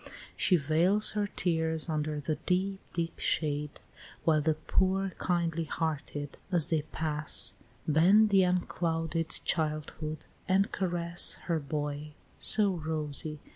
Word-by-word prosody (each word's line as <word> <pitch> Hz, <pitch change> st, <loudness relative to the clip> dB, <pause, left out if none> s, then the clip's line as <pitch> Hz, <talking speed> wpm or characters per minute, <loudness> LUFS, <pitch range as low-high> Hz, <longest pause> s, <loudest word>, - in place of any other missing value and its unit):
She 185 Hz, -, +3 dB
veils 170 Hz, +7 st, +3 dB
her 210 Hz, -1 st, -1 dB
tears 160 Hz, -4 st, -1 dB
under 155 Hz, -1 st, -2 dB
the 150 Hz, +2 st, -2 dB
deep, 190 Hz, +2 st, 0 dB
deep 165 Hz, -1 st, -3 dB
shade, 150 Hz, -1 st, -1 dB, 0.5 s
While 155 Hz, -2 st, +4 dB
the 155 Hz, +1 st, +1 dB
poor 190 Hz, +4 st, 0 dB
kindly 170 Hz, -2 st, 0 dB
hearted, 150 Hz, -3 st, -4 dB
as 170 Hz, -4 st, +4 dB
they 160 Hz, -2 st, +1 dB
pass, 155 Hz, -1 st, +1 dB, 0.3 s
Bend 190 Hz, +8 st, +5 dB
to 195 Hz, -1 st, +6 dB
unclouded 165 Hz, -2 st, -1 dB, 0.2 s
childhood, 155 Hz, -1 st, -2 dB, 0.2 s
and 195 Hz, +2 st, +2 dB
caress 175 Hz, -2 st, +2 dB
Her 165 Hz, -2 st, 0 dB
boy, 150 Hz, 0 st, -4 dB, 0.3 s
so 210 Hz, -2 st, +3 dB
rosy! 155 Hz, -1 st, -4 dB
160 Hz, 120 wpm, -30 LUFS, 155-180 Hz, 0.5 s, to